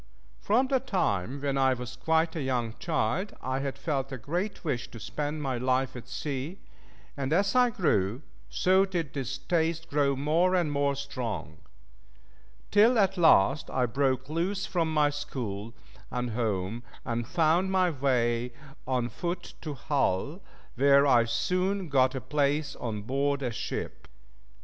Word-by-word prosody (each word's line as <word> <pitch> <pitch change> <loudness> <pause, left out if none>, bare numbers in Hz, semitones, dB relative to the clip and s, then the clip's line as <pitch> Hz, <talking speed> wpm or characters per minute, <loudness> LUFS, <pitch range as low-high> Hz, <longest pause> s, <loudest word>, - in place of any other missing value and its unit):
From 235 +6 +2
the 265 0 +2
time 140 - -1
when 140 -1 0
I 130 -1 +4
was 125 -1 -7
quite 160 +1 +1
a 160 - -2
young 125 -4 -1
child, 175 +4 -1
I 130 +1 -2
had 135 -1 -3
felt 135 -1 -2
a 135 - -4
great 175 - -3
wish 130 -6 -2
to 115 - -10
spend 150 +5 -3
my 130 -3 -1
life 130 +1 0
at 125 0 -8
sea, 140 +5 -4 0.6
and 140 -1 -3
as 195 +5 +2
I 250 -1 +5
grew, 125 - 0 0.3
so 190 +1 +3
did 175 -7 -3
this 135 -1 -3
taste 165 +2 -1
grow 140 -1 +2
more 165 +7 +2
and 170 -5 +1
more 140 -1 +1
strong; 115 - -5 1.1
till 225 +4 +5
at 195 -2 +3
last 150 - +4
I 130 -1 +1
broke 130 +1 0
loose 185 +5 -1
from 170 -5 0
my 150 -2 +3
school 115 -7 -5 0.4
and 125 -1 -2
home, 110 -1 -1 0.2
and 115 -1 -2
found 170 +5 +2
my 185 -2 +3
way 125 -4 0 0.3
on 125 -2 0
foot 175 +6 -5
to 150 -3 -5
Hull, 140 - -1 0.3
where 140 +2 +5
I 120 -4 +5
soon 180 - 0
got 130 -1 +3
a 130 - -3
place 145 +2 0
on 110 -4 -4
board 140 +4 0
a 125 - -1
ship. 110 - -5
140 Hz, 155 wpm, -28 LUFS, 125-165 Hz, 1.1 s, I